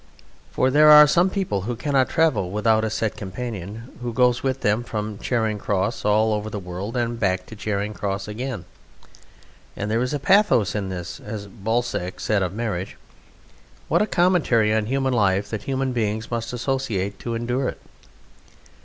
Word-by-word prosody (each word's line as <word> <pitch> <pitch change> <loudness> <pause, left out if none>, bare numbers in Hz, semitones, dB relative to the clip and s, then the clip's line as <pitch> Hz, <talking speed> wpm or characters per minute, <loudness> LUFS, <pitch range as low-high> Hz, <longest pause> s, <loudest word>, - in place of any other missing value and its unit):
For 130 - +1
there 150 +2 +6
are 150 0 +10
some 175 +5 +3
people 185 - -1
who 120 +5 -3
cannot 130 0 +1
travel 145 - +2
without 110 +2 +2
a 110 - 0
set 110 0 -2
companion 105 +2 -6
who 120 -1 -3
goes 125 0 +3
with 135 -1 -1
them 105 +3 +1
from 105 -3 -4
Charing 110 -4 -1
Cross 100 +2 -1
all 110 +1 +3
over 105 0 -2
the 105 - -5
world 95 +5 -5
and 120 -1 -1
back 95 -3 0
to 110 - -11
Charing 105 0 -2
Cross 100 -1 -3
again. 110 -3 -5 1.1
And 105 +1 -3
there 115 +2 +1
is 125 +1 -1
a 145 - 0
pathos 190 - +3
in 100 -3 -2
this: 90 -1 -6
as 105 -1 -6
Balzac 100 -2 -2
said 105 -2 +1
of 90 -2 -1
marriage, 100 -3 -4 0.9
"What - - +3
a 210 - +2
commentary 155 - +3
on 110 -1 0
human 135 +1 0
life, 100 -3 +1
that 110 -2 -4
human 135 -1 -1
beings 110 -2 -2
must 115 -1 -3
associate 120 -6 -2
to 115 -1 -4
endure 120 +3 -1
it." - - -8
110 Hz, 175 wpm, -23 LUFS, 100-125 Hz, 1.1 s, are